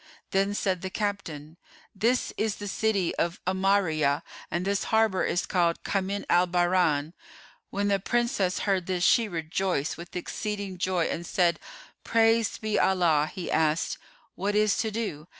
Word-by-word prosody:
Then 195 +1 +1
said 185 -3 0
the 190 - -4
captain, 175 -7 -4 0.4
"This 230 +6 +1
is 215 -1 -1
the 205 - -7
city 200 -3 0
of 170 0 -1
'Amáriyah 185 -6 +2 0.3
and 175 +2 -2
this 200 0 0
harbour 220 -4 +2
is 175 - 0
called 170 -2 +1
Kamín 200 +1 -2
al 175 +1 +4
Bahrayn."[FN#429] 175 -4 +2 0.6
When 200 +1 -1
the 200 -1 +2
Princess 220 -3 0
heard 190 -3 0
this 180 -2 -1
she 230 +3 +4
rejoiced 165 -3 -2
with 170 +1 -10
exceeding 200 0 -4
joy 185 -2 +1
and 170 - -3
said, 175 0 +1 0.4
"Praised 225 -1 +2
be 215 -1 0
Allah!" 165 -5 +3
He 180 - -5
asked, 160 0 +1 0.3
"What 205 +2 -2
is 210 -1 +3
to 220 - 0
do?" 205 -9 -4
190 Hz, 150 wpm, -27 LUFS, 170-205 Hz, 0.6 s, al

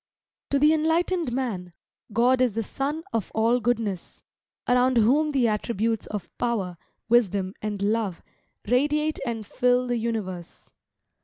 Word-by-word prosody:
To 280 - +2
the 300 +3 +5
enlightened 325 0 +1
man, 215 -9 -3 0.4
God 245 +4 +3
is 250 -4 +3
the 225 +2 -1
sun 290 +8 -3
of 225 -4 -2
all 230 +3 +3
goodness, 225 -6 -2 0.4
around 250 0 +3
whom 275 +8 +4
the 265 -5 +2
attributes 225 +1 -1
of 200 -5 -6
Power, 200 -8 -1 0.3
Wisdom, 200 -5 +2
and 205 -2 -3
Love, 205 -4 -1 0.4
radiate 295 +6 +1
and 225 -2 -3
fill 250 +3 +2
the 245 -1 -1
universe. 210 -7 -5
235 Hz, 135 wpm, -25 LUFS, 210-260 Hz, 0.4 s, the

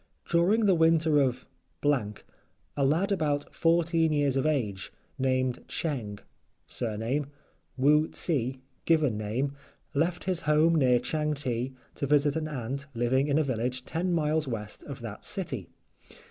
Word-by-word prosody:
During 195 +7 +3
the 195 - +5
winter 160 -2 +4
of 130 -1 0 0.2
—— - - -44
a 135 +1 -3
lad 165 +9 +2
about 150 -6 -1
fourteen 165 -1 +2
years 145 -3 +1
of 135 +2 +1
age, 105 -11 -1 0.3
named 130 -1 0
Cheng 120 -11 -3 0.5
(surname) 120 +5 -2 0.5
Woo 150 +4 +4
tse 130 -5 -1 0.2
(given 155 -8 +3
name), 115 +7 -2 0.4
left 165 +5 0
his 185 -2 0
home 155 +2 +5
near 130 -6 +4
Changte 135 -3 -2 0.2
to 140 - -3
visit 145 +1 +3
an 160 -1 -1
aunt 140 0 -4
living 130 +4 +2
in 145 0 +2
a 155 - +3
village 125 -1 -2
ten 175 +3 -1
miles 155 -2 +1
west 105 -4 -5
of - - -8
that - - -7
city. - - -4
145 Hz, 140 wpm, -28 LUFS, 125-160 Hz, 0.5 s, the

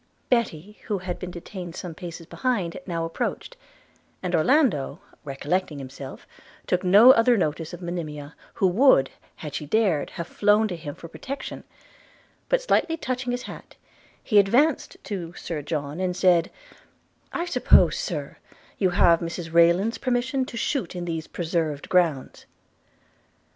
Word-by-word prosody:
Betty, 210 -5 -1
who 210 - -1
had 180 -1 -5
been 180 - -5
detained 175 0 -8
some 180 -3 -6
paces 170 +1 -8
behind, 200 -6 -2
now 165 -2 -2
approached; 165 - -4 0.7
and 180 -1 -2
Orlando, 170 - +2 0.2
recollecting 150 +4 -2
himself, 135 0 -9 0.4
took 180 +1 0
no 205 +7 +8
other 235 -1 +4
notice 160 -2 -1
of 175 0 -9
Monimia, 155 -4 -5 0.2
who - - +1
would, 185 - +4 0.2
had 150 -3 -8
she 150 0 -4
dared, 190 -5 +1
have 170 - -3
flown 210 +4 +3
to 180 - -3
him 155 -3 -7
for 165 - -10
protection: 270 - -7 0.8
but, - - +2
slightly 330 -9 +1
touching 255 -4 -3
his 245 0 -3
hat, - - -10 0.5
he 210 -3 +4
advanced 250 +10 +2
to 175 -5 -5
Sir 160 -3 -5
John, 145 +1 -4
and 185 -1 -1
said, 175 -3 +4 0.8
'I 345 - -2
suppose, 350 - +4
Sir, - - -4 0.4
you 190 - +3
have 170 -1 +4
Mrs 170 -1 -5
Rayland's 170 +7 +4
permission 255 +1 0
to 235 - -8
shoot 230 - -2
in 175 -1 -4
these 165 -2 -4
preserved 160 -4 -2
grounds?' 165 -7 0
180 Hz, 145 wpm, -25 LUFS, 165-225 Hz, 0.8 s, no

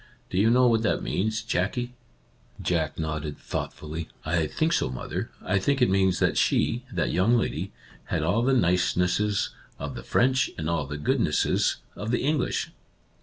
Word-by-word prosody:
Do 90 - +1
you 110 +3 +5
know 125 +2 +5
what 115 -2 +4
that 110 - 0
means, 110 +3 -1
Jackie? 115 +4 -1 0.4
" - - -35 0.3
Jack 80 -4 -1
nodded, 75 -2 -3
thoughtfully. 80 +1 -5
" - - -26
I 80 0 +1
think 160 - 0
so, 65 - +1
mother. 65 - -4
I 100 +1 +1
think 140 +8 +1
it 125 -6 +4
means 95 -1 +3
that - - +2
she - - +2
— - - -20
that - - 0
young 100 +8 +3
lady 115 - -2 0.2
— - - -22
had 75 - -1
all 90 +8 +2
the 135 +3 +3
nicenesses 90 +1 +2 0.3
of - - -5
the - - -6
French 130 0 +2
and 80 - -3
all 85 -5 0
the 75 +1 -5
goodnesses 75 - +1 0.2
of 105 +4 -5
the 120 +1 +1
English." 145 -1 0
95 Hz, 185 wpm, -26 LUFS, 80-120 Hz, 0.4 s, you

